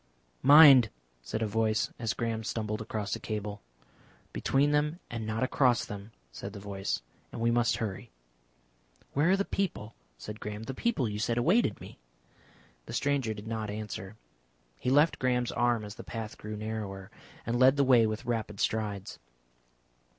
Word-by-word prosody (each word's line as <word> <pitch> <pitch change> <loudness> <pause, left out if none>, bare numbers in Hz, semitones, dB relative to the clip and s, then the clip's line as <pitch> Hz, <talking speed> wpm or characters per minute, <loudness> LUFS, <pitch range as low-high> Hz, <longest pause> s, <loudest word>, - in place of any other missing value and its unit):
"Mind!" 140 -5 +9 0.3
said 110 - -3
a - - +2
voice, 110 0 0
as 115 -2 -1
Graham 115 -1 -2
stumbled 110 -1 -3
against 105 -2 -3
a - - -7
cable. 105 -1 -5 0.7
"Between 140 +2 +2
them 150 +3 +1
and 115 -2 -4
not 110 +3 -1
across 130 -2 +2
them," 105 +1 -8 0.2
said 100 +12 -7
the 105 - -8
voice. 95 -7 -3 0.3
And, - - -7
"We 115 +1 +2
must 115 -2 +2
hurry." 100 -5 -4 1.0
"Where 150 +5 +3
are 190 - +4
the 200 - 0
people?" 170 - -3 0.2
said 105 - -8
Graham. 105 +1 -6
"The 135 - -5
people 160 - 0
you 105 0 -4
said 115 +2 0
awaited 165 - +2
me?" - - -12 0.9
The - - -7
stranger 135 -6 0
did 105 0 -9
not 110 -1 -3
answer. 105 -1 -6 0.6
He 125 - -3
left 145 +5 +4
Graham's 125 -1 +1
arm 120 -2 +1
as 105 - -7
the - - -10
path 110 -2 -6
grew 105 0 -7
narrower, 105 -3 -5 0.3
and 120 +2 -1
led 130 +1 +6
the 140 - +4
way 125 -4 +5
with 110 0 -4
rapid 110 -4 -3
strides. 105 -3 -2
110 Hz, 165 wpm, -30 LUFS, 105-125 Hz, 1.0 s, Mind